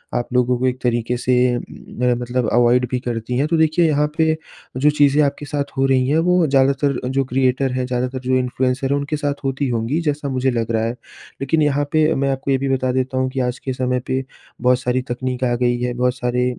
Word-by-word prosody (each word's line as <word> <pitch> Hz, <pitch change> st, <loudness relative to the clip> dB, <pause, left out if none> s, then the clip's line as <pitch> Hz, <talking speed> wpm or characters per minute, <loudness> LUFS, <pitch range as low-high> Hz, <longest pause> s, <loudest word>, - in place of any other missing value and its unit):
आप 120 Hz, -1 st, -1 dB
लोगों 125 Hz, 0 st, +2 dB
को 130 Hz, -, +1 dB
एक 125 Hz, 0 st, -1 dB
तरीके 120 Hz, 0 st, 0 dB
से 125 Hz, +1 st, 0 dB, 0.4 s
मेरा 125 Hz, 0 st, -2 dB
मतलब 120 Hz, 0 st, -2 dB
अवॉइड 120 Hz, +1 st, +4 dB
भी 125 Hz, -, 0 dB
करती 120 Hz, 0 st, -3 dB
हैं 145 Hz, -, +1 dB
तो 165 Hz, +1 st, +1 dB
देखिए 160 Hz, +2 st, +3 dB
यहाँ 150 Hz, 0 st, +2 dB
पे 160 Hz, 0 st, +2 dB, 0.4 s
जो 145 Hz, +3 st, +4 dB
चीज़ें 145 Hz, 0 st, +3 dB
आपके 145 Hz, +1 st, -2 dB
साथ 140 Hz, 0 st, -3 dB
हो 135 Hz, -, +3 dB
रही 130 Hz, -1 st, +2 dB
हैं 150 Hz, -, +2 dB
वो 180 Hz, -1 st, +4 dB
ज़्यादातर 140 Hz, 0 st, +2 dB
जो 135 Hz, +1 st, +1 dB
क्रिएटर 130 Hz, +1 st, +1 dB
हैं 130 Hz, 0 st, -1 dB
ज़्यादातर 125 Hz, +1 st, -2 dB
जो 130 Hz, 0 st, 0 dB
इन्फ्लुएंसर 130 Hz, +1 st, -1 dB
है -, -, +3 dB
उनके 145 Hz, +2 st, -2 dB
साथ 145 Hz, -1 st, -1 dB
होती 135 Hz, +1 st, -1 dB
होंगी, 120 Hz, +6 st, -1 dB
जैसा 150 Hz, -2 st, -2 dB
मुझे 130 Hz, 0 st, 0 dB
लग 115 Hz, -2 st, -2 dB
रहा 110 Hz, -1 st, +1 dB
है। 115 Hz, -, 0 dB, 0.5 s
लेकिन 145 Hz, +4 st, +1 dB
यहाँ 145 Hz, -1 st, +1 dB
पे 155 Hz, 0 st, +3 dB
मैं 140 Hz, 0 st, 0 dB
आपको 135 Hz, +1 st, -2 dB
ये 135 Hz, -, +3 dB
भी 135 Hz, +1 st, -2 dB
बता 130 Hz, -1 st, 0 dB
देता 130 Hz, +1 st, -1 dB
हूँ 130 Hz, 0 st, +1 dB
कि 135 Hz, -, -3 dB
आज 125 Hz, 0 st, -1 dB
के 130 Hz, -, -4 dB
समय 125 Hz, 0 st, -1 dB
पे 130 Hz, +1 st, -1 dB, 0.4 s
बहुत 125 Hz, 0 st, +3 dB
सारी 125 Hz, 0 st, 0 dB
तकनीक 125 Hz, +1 st, -3 dB
आ 120 Hz, -1 st, +2 dB
गई 120 Hz, 0 st, +1 dB
है 125 Hz, 0 st, -1 dB
बहुत 125 Hz, +1 st, 0 dB
सारे 125 Hz, 0 st, 0 dB
130 Hz, 230 wpm, -20 LUFS, 125-140 Hz, 0.5 s, अवॉइड